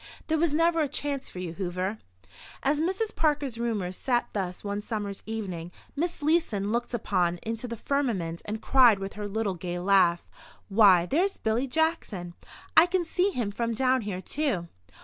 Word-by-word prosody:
There 320 - +1
was 335 -1 +2
never 330 +2 +3
a 300 - +2
chance 280 -1 -3
for - - -11
you, 180 -2 -4
Hoover. 185 +3 -3 0.6
As 290 +2 +2
Mrs. 385 +6 -1
Parker's 290 -6 0
roomers 210 -6 -2
sat 245 +1 0
thus 185 -3 -3
one 205 0 -3
summer's 205 -2 -4
evening, 185 -6 -4 0.2
Miss 335 +1 -2
Leeson 285 - +1
looked 240 +1 -1
up 175 -6 0
into 225 +2 -3
the 235 -1 -5
firmament 210 -13 -1
and 215 +1 -4
cried 245 -5 +6
with 195 0 -5
her 210 0 -5
little 210 -1 -1
gay 175 0 -4
laugh: 180 -2 +3 0.4
"Why, 195 -4 +6
there's 355 - +1
Billy 225 +4 0
Jackson! 255 - -1 0.4
I 330 - +8
can 360 -1 0
see 360 +4 +1
him 240 - -2
from 230 +2 -2
down 255 +1 +2
here, 200 -4 -4
too." 205 - -2
225 Hz, 170 wpm, -27 LUFS, 195-290 Hz, 0.6 s, I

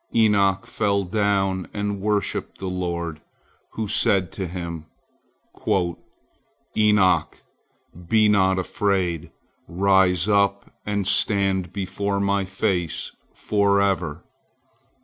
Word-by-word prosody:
Enoch 100 -4 +3
fell 100 -2 0
down 95 -2 0
and 100 -1 -2
worshipped 105 0 -1
the 95 - -7
Lord, 85 -3 -3 0.5
who 110 -1 -3
said 95 -3 +2
to 95 -3 -4
him: 85 -2 -6 1.9
"Enoch, 105 -3 +2 0.7
be 110 -1 +4
not 95 -2 +3
afraid! 95 -3 -1 0.4
Rise 95 0 +2
up 100 -1 +1
and 100 -2 -1
stand 95 -3 +1
before 100 +1 -2
My 100 0 +1
face 95 -3 -2 0.2
forever." 100 -5 +1
100 Hz, 90 wpm, -23 LUFS, 90-100 Hz, 1.9 s, be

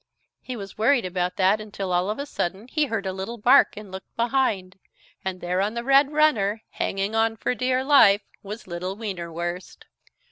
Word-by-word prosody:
He 255 - -6
was 200 -3 -9
worried 235 0 +3
about 180 0 -2
that 195 +3 +3
until 195 -3 -4
all 180 +2 +1
of 215 - -2
a 280 - -4
sudden 195 -5 -4
he 305 +3 +1
heard 225 -7 -3
a 190 - -2
little 195 +5 -5
bark 250 +3 +5
and 210 -2 -9
looked 190 0 -10
behind, 230 -7 0 0.4
and 185 -1 -4
there 180 +2 0
on 210 +3 -1
the 235 - -3
red 275 +2 +4
runner, 225 -9 +2
hanging 195 +2 -2
on 225 0 +1
for 250 - -1
dear 255 +1 0
life, 225 -8 +6 0.2
was 210 +3 -8
little 185 +2 -5
Wienerwurst. 175 -4 -5
205 Hz, 185 wpm, -24 LUFS, 185-240 Hz, 0.4 s, life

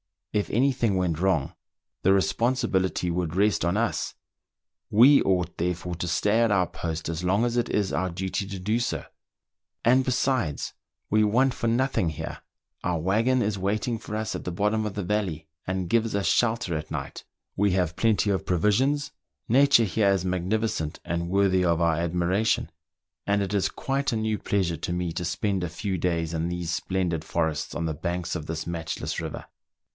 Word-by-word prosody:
If 105 -1 0
any 130 +6 +3
thing 120 -6 0
went 90 -4 0
wrong, 90 -7 +1 0.5
the 95 - +5
responsibility 95 -3 +1
would 85 -1 -2
rest 105 +2 +2
on 85 +2 +1
us; 115 +1 -1 0.7
we 130 +7 +7
ought, 90 -2 0
therefore, 90 +1 -2
to 90 +1 -3
stay 105 +6 +2
at 115 -1 +4
our 100 -3 +3
post 80 -2 -5
as 85 +1 -3
long 100 +5 +2
as 120 0 -1
it 120 - +1
is 100 -2 0
our 95 0 0
duty 95 +2 -3
to 100 -1 -5
do 105 +5 0
so. 120 - -2 0.8
And 130 +2 +4
besides, 125 - 0 0.4
we 110 +1 +4
want 125 +5 +3
for 115 - -2
nothing 115 -7 +1
here: 80 +1 -6 0.4
our 90 -1 0
waggon 115 +9 +2
is 100 -1 -1
waiting 110 +4 -1
for 105 - -6
us 110 0 -2
at - - -6
the 90 - -2
bottom 105 +4 +1
of 105 - -4
the 100 - -2
valley, 90 -5 -2 0.2
and 95 -1 -2
gives 115 -1 +1
us 100 - 0
shelter 110 -7 +1
at 75 - -6
night; - - -6 0.3
we 100 0 +3
have 90 -2 0
plenty 110 -2 +2
of 95 - -1
provisions; 125 - +1 0.4
..tture 135 -2 +6
here 100 0 +2
is 95 -2 +1
magnificent 95 -2 -1
and 85 +1 -2
worthy 95 -1 +3
of 85 -1 +2
our 85 -1 +3
admiration; 90 +3 0 0.6
and 100 0 +2
it 100 +1 -4
is 100 -2 +2
quite 135 -1 -1
a - - 0
new 110 -1 -1
pleasure 90 -5 0
to 85 - -3
me 90 -1 -1
to 85 - -3
spend 95 +2 -1
a 90 - -2
few 95 +3 -3
days 85 -2 -1
in 80 +1 -1
these 90 -1 -3
splendid 90 -4 -1
forests 80 -2 -1
on 85 - -2
the 80 - -1
banks 85 +2 -3
of 80 -4 -4
this 80 0 -4
matchless 85 -2 -3
river. - - -5
95 Hz, 185 wpm, -26 LUFS, 85-110 Hz, 0.8 s, we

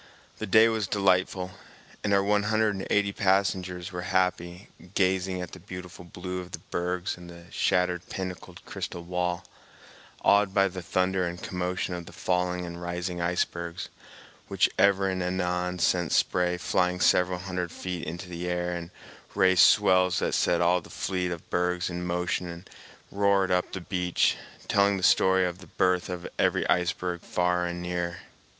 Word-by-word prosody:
The - - -3
day 110 +1 +7
was 110 -3 0
delightful, 95 -2 +1 0.5
and 105 - 0
our 100 -1 +4
one 105 +1 +2
hundred 110 -1 +2
and 95 -1 -5
eighty 100 -1 +2
passengers 95 -3 0
were 90 -1 -4
happy, 90 0 -1 0.3
gazing 95 -1 +1
at 90 - -8
the 90 - -10
beautiful 90 -1 -9
blue 90 +1 -6
of 90 0 -12
the - - -3
bergs 90 +1 -2
and 90 0 -11
the 85 0 -12
shattered 90 -1 0
pinnacled 90 -1 -6
crystal 85 - -5
wall, 90 0 -2 0.8
awed 100 -1 +4
by 95 -1 +4
the 90 0 -7
thunder 95 0 0
and 85 +1 -6
commotion 90 0 -2
of 85 -2 -6
the - - -11
falling 90 0 -1
and 85 0 -7
rising 90 0 -3
ice 90 +1 +2
bergs, 85 0 -6 0.6
which - - +3
ever 100 -1 +4
and 95 -1 -1
anon 90 0 -1
sent 90 -1 +1
spray 90 0 +2
flying 90 0 0
several 90 0 +3
hundred 90 -2 -4
feet 90 -1 -5
into 85 +3 -6
the 90 0 -5
air 90 0 -1
and 85 -1 -5 0.5
raised 95 -2 +5
swells 90 -4 +5
that - - 0
set 85 - +2
all 90 +1 +3
the - - -15
fleet 90 -1 -2
of 85 -2 -6
bergs 90 0 0
in 90 0 -4
motion 90 0 -1
and 85 +2 -9 0.4
roared 100 -1 +2
up 90 0 +1
the 95 - -4
beach, 90 0 +1 0.3
telling 100 0 +3
the 95 - -5
story 95 0 +4
of 90 0 -4
the 95 - -13
birth 90 0 +1
of 90 -1 -5
every - - +2
iceberg 90 0 0
far 90 0 0
and 85 0 -5
near. 85 -1 -3
90 Hz, 170 wpm, -27 LUFS, 90-95 Hz, 0.8 s, day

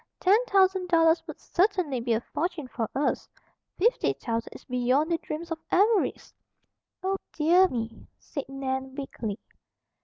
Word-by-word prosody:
Ten 410 +6 +4
thousand 380 -2 +3
dollars 330 -1 +4
would - - -8
certainly 365 - +1
be 235 0 0
a 225 - +1
fortune 320 0 -3
for 230 -3 -3
us; 285 +2 0 0.5
fifty 465 +7 +2
thousand 230 -1 -3
is - - -13
beyond 255 +5 +1
the 335 - +1
dreams 330 +2 -6
of 325 - -2
avarice." 415 +2 +2 0.7
"Oh, 385 +1 0 0.2
dear 345 +5 +5
me!" 230 -6 -5
said 280 -3 -7
Nan 265 -1 -3
weakly. 230 -7 -4
310 Hz, 145 wpm, -27 LUFS, 260-370 Hz, 0.7 s, dear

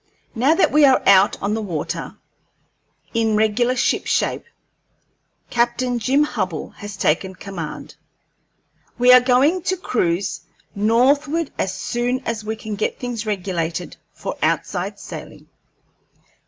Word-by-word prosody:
Now 265 +7 +3
that 380 - +3
we 300 0 +5
are 265 -2 +6
out 195 0 +5
on 200 +1 0
the 220 - -1
water, 175 -8 -4 1.0
in 225 -2 +1
regular 220 +4 +2
shipshape, 245 - 0 1.1
Captain 240 +1 0
Jim 265 +6 +2
Hubbell 300 - -3
has 205 -1 -8
taken 185 +3 0
command. 180 -7 -7 1.0
We 250 +1 +6
are 250 - +9
going 265 +8 +3
to 370 +2 -1
cruise 195 - -1 0.3
northward 275 +9 +2
as 190 - 0
soon 245 +2 -2
as 225 -2 -3
we 220 +1 -3
can 220 -1 -7
get 210 +1 -2
things 235 -3 -5
regulated 180 -4 -3
for - - -6
outside - - -1
sailing. - - -10
230 Hz, 125 wpm, -21 LUFS, 200-255 Hz, 1.1 s, are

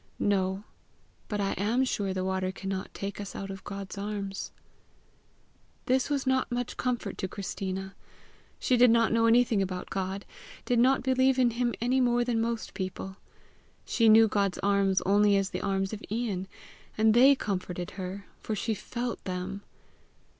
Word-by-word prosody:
"No; 190 -1 0 0.6
but 210 - -3
I 195 -1 0
am 225 +6 +2
sure 205 -6 -1
the 185 0 -2
water 190 0 -1
cannot 190 0 -5
take 200 +1 -5
us 200 - -7
out 195 0 -5
of 195 -1 -8
God's 195 0 -6
arms." 200 -1 -4 1.3
This 260 +2 +2
was 280 -2 0
not 260 -1 +1
much 245 0 -2
comfort 250 -2 -2
to 190 - -1
Christina. 190 0 -5 0.6
She 250 - +2
did 245 0 +7
not 230 -1 +4
know 230 0 +4
anything 230 -3 +4
about 185 -1 -4
God 195 +1 -3 0.4
did 245 -2 +2
not 260 +2 +4
believe 260 0 +3
in 250 -2 +4
him 240 0 -1
any 255 +3 +2
more 240 -1 +3
than 235 -2 0
most 230 0 -3
people. 190 0 -5 0.7
She 230 -2 +3
knew 220 +1 +8
God's 200 -3 0
arms 200 -1 +2
only 205 +1 +4
as 195 -1 -1
the - - -3
arms 195 +1 -1
of 215 - -6
Ian 210 -4 -2 0.5
and 220 0 +4
THEY 265 +4 +7
comforted 180 -6 -4
her, 190 +1 -6
for 220 - -3
she 220 +2 -1
FELT 235 +3 -4
them! 185 +1 -4
205 Hz, 165 wpm, -29 LUFS, 195-240 Hz, 1.3 s, knew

